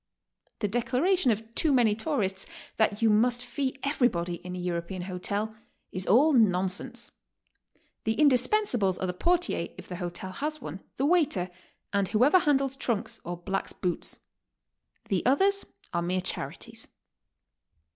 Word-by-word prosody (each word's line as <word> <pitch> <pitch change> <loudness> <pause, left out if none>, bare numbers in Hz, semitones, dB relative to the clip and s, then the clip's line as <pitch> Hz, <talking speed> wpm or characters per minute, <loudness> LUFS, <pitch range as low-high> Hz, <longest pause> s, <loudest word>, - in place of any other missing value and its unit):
The 210 - +2
declaration 255 - +2
of 225 +1 -1
too 315 +3 +2
many 240 -5 +4
tourists 210 -6 -1 0.3
that 215 0 +2
you 225 - +6
must 245 +3 +3
fee 265 +1 -2
everybody 180 - +1
in 180 +1 -7
a - - -5
European 175 +1 -3
hotel, 200 +4 -3 0.4
is 185 0 -4
all 280 +10 +5
nonsense. 190 -5 +1 0.9
The 220 - +1
indis 255 -4 +5
pensables 245 - +2
are - - -1
the 180 - -2
portier, 340 - +1
if - - -10
the 180 - -6
hotel 180 +1 -5
has 305 +10 -3
one, 160 - -7 0.2
the 270 - +1
waiter, 285 - +2 0.4
and 200 -1 +2
whoever 255 - +5
handles 275 -4 +2
trunks 230 -3 -2
or 175 +1 -4
blacks 195 +3 -3
boots. 180 -2 -3 0.9
The 190 -3 +1
others 390 +10 +3 0.3
are 170 - +1
mere 180 +2 0
charities. 185 - -4
220 Hz, 145 wpm, -28 LUFS, 185-270 Hz, 0.9 s, you